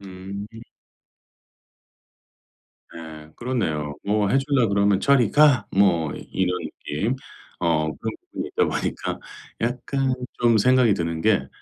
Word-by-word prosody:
음. 95 +1 -8 2.5
예. 80 -2 -10
그렇네요. 80 - -2
뭐 105 -1 +1
해 135 - +4
주려고 135 -5 +1
그러면 100 -1 +3
"저리 130 -3 +3
가." 145 -3 +5
뭐 85 -7 +2 0.2
이런 90 -1 0
느낌. 105 - -3 0.5
어 80 -2 +1
그런 - - -4 0.2
부분이 - - -4
있다 - - +1
보니까 - - -3 0.4
약간 130 +3 -1 0.3
좀 120 -2 +4
생각이 125 -1 +4
드는 85 -2 -2
게 95 -10 +2
100 Hz, 215 characters per minute, -23 LUFS, 85-125 Hz, 2.5 s, 가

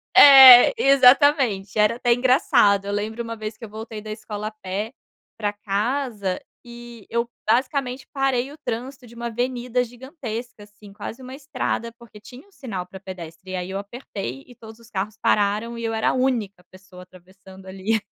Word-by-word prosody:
É, 265 - +10
exatamente, 265 - +4
era 210 +2 +3
até 240 -1 +2
engraçado, 245 - +3
eu 200 - -4
lembro 215 +3 -3
uma 230 0 -7
vez 215 0 -6
que - - -15
eu 225 - -8
voltei 220 0 -8
da 215 0 -8
escola 215 -1 -6
a - - -5
pé 210 +1 -5 0.5
para 210 -2 -2
casa, 205 -1 -2 0.3
e 235 -2 -12
eu 235 0 -2 0.2
basicamente 255 +1 0
parei 270 -1 0
o 295 - -13
trânsito 250 +2 -5
de 235 - -16
uma 235 0 -5
avenida 245 +1 -2
gigantesca, 245 -3 -8
assim, 205 0 -16
quase 225 +5 -8
uma 255 0 -10
estrada, 270 -4 -4
porque 235 -3 -15
tinha 245 - -14
um 405 - -27
sinal 230 - -6
para 190 +1 -12
pedestre, 185 -1 -10
e - - -3
aí 180 0 -4
eu 195 +1 -4
apertei 200 - -7
e 245 - -16
todos 225 -1 -14
os 230 0 -18
carros 205 -1 -4
pararam 210 +3 0
e 230 - -6
eu 225 - -2
era 220 - +1
a - - 0
única 235 -8 -1
pessoa 185 -1 -15
atravessando 190 +1 -17
ali. 195 +4 -2
225 Hz, 180 wpm, -22 LUFS, 200-250 Hz, 0.5 s, É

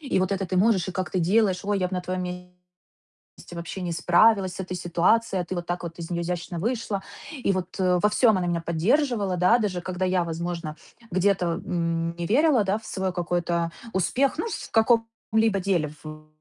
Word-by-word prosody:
И 275 -9 -1
вот 185 +1 +1
это 195 -1 -2
ты 185 - -2
можешь. 195 -2 +3
И - - -3
как 185 -1 -3
ты 185 - 0
делаешь? 190 +1 +2
Ой, 205 0 0
я 180 -1 0
б - - -16
на 180 - -1
твоём 185 +1 -3
месте 180 0 -10 0.7
вообще 170 +3 -6
не 175 -1 -2
справилась 185 +3 +3
с - - -7
этой 185 0 -4
ситуацией, 180 +3 +1
а - - -7
ты 185 - -5
вот 175 -1 -4
так 175 0 -3
вот 170 0 -7
из 170 0 -7
неё 170 - -1
изящно 175 0 -4
вышла". 215 -1 -2 0.4
И - - +4
вот 185 0 -4
во 180 +2 +3
всём 230 +2 +4
она 180 - -1
меня 170 -1 0
поддерживала, 200 - +1
да. 185 +7 +4
Даже 200 -6 -1
когда 185 +1 -3
я, 185 -1 +2
возможно, 165 -1 -4 0.3
где-то, 185 0 +2 0.2
м, 170 -1 -1
не 170 - -2
верила, 265 - +4
да, 195 +1 +1
в 220 - -18
свой 190 -1 -2
какой-то 175 -1 -1 0.2
успех, 255 - +1
ну, 445 - -1
в - - -6
каком-либо 225 -2 +2
деле, 180 -5 0 0.2
в 155 0 -9
185 Hz, 205 wpm, -25 LUFS, 175-205 Hz, 0.7 s, И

